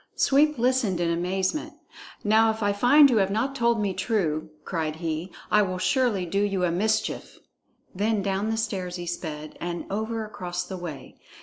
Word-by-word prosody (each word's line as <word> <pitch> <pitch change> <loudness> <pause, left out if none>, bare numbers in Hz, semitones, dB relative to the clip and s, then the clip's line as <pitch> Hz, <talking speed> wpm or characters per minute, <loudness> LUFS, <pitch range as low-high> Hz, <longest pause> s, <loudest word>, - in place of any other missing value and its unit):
Sweep 295 +2 +3
listened 240 -6 +1
in 170 -1 +1
amazement. 185 - -1 0.5
"Now 220 +2 +4
if 220 0 -2
I 205 0 +2
find 270 +8 +6
you 245 -4 +2
have 195 -2 +3
not 225 +7 -1
told 235 -3 +2
me 200 -2 0
true," 180 -6 -1 0.2
cried 160 -3 -2
he, 165 +2 -4 0.2
"I 210 - +5
will 185 -2 -1
surely 215 -2 +1
do 195 +4 0
you 195 -3 0
a 175 - +2
mischief!" 215 +6 -1 0.6
Then 205 +1 0
down 195 +2 -1
the 225 - -1
stairs 190 -5 -3
he 175 -1 -5
sped, 155 -3 -6
and 175 0 -4
over 220 +2 -2
across 180 -4 -4
the 190 - -6
way. 170 -5 -8
195 Hz, 180 wpm, -26 LUFS, 175-225 Hz, 0.6 s, find